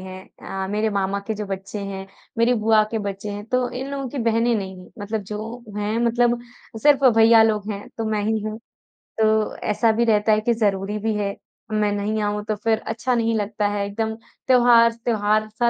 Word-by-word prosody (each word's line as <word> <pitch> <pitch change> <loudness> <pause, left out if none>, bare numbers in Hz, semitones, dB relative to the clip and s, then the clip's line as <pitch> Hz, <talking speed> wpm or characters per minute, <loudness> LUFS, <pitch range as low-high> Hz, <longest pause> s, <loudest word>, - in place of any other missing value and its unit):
हैं 185 0 -8 0.4
अ, - - -4
मेरे 215 +1 0
मामा 200 0 -1
के 220 - -2
जो 210 0 -5
बच्चे 195 +2 -5
हैं, 195 -1 -6 0.3
मेरी 235 +2 +4
बुआ 220 -1 +5
के 225 - -1
बच्चे 200 +1 -5
हैं 205 0 -6
तो 250 -1 +2
इन 265 +2 -5
लोगों 275 -1 -4
की 275 - -6
बहनें 230 0 +2
नहीं 190 -3 -4
हैं 180 - -15
मतलब 210 +1 -3
जो 220 +4 -7
हैं 210 +2 -1
मतलब 240 +1 +2 0.4
सिर्फ 285 -2 +5
भैया 225 0 +7
लोग 215 -1 0
हैं 200 0 -8
तो 225 - -1
मैं 210 -1 0
ही 220 +1 +1
हूँ। 215 0 -4 0.6
तो 220 -1 +2
ऐसा 220 +2 +1
भी 230 +2 +1
रहता 215 -1 +3
है 215 - +3
कि 235 +2 +1
ज़रूरी 205 -2 0
भी 220 +1 -1
है। 200 -1 -2 0.4
मैं 210 -1 +1
नहीं 210 +1 -1
आऊँ 210 0 -1
तो 215 - 0
फ़िर 220 +1 0
अच्छा 235 +3 -1
नहीं 230 -1 +1
लगता 210 0 -1
है, 205 0 -1
एकदम 220 +2 -2 0.3
त्योहार 240 -2 +6
त्योहार-सा 215 0 0
215 Hz, 205 wpm, -22 LUFS, 205-230 Hz, 0.6 s, भैया